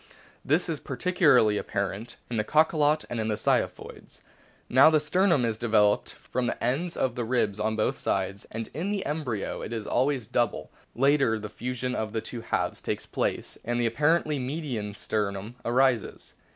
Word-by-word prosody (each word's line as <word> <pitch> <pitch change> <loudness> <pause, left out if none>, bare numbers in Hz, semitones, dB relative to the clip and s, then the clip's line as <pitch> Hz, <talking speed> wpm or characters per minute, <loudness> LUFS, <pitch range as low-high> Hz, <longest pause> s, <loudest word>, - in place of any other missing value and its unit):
This 155 +6 +2
is 160 -4 -2
particu 180 +8 -4
larly 110 -7 +5
apparent 100 +4 -3
in 120 - -3
the 105 - +1
Cachalot 155 +2 +3
and 120 - -4
in 110 - -1
the 110 - 0
Ziphioids. - - -2 0.5
Now 130 +5 +7
the 155 -1 +4
sternum 170 -3 +2
is 110 -1 -2
developed 105 -3 +2
from 125 -1 -3
the - - -3
ends 145 +9 -1
of 130 - 0
the 120 - -3
ribs 110 -4 0
on 110 +1 0
both 110 - 0
sides, 100 +1 -2
and 115 0 -5
in 165 +8 -3
the 205 -2 -2
embryo 140 -9 -3
it - - -6
is 110 -2 -3
always 130 -1 +1
double; 120 -1 -1 0.2
later 135 -3 +3
the 105 -1 -6
fusion 125 +3 -3
of 110 -3 -3
the 110 - -1
two 115 +1 -7
halves 115 - -2
takes - - -3
place, - - -3
and 120 0 -1
the 120 - +1
apparently 150 +5 +2
median 125 -7 -4
sternum 105 +1 -3
arises. 125 -2 +1
120 Hz, 180 wpm, -27 LUFS, 110-145 Hz, 0.5 s, Now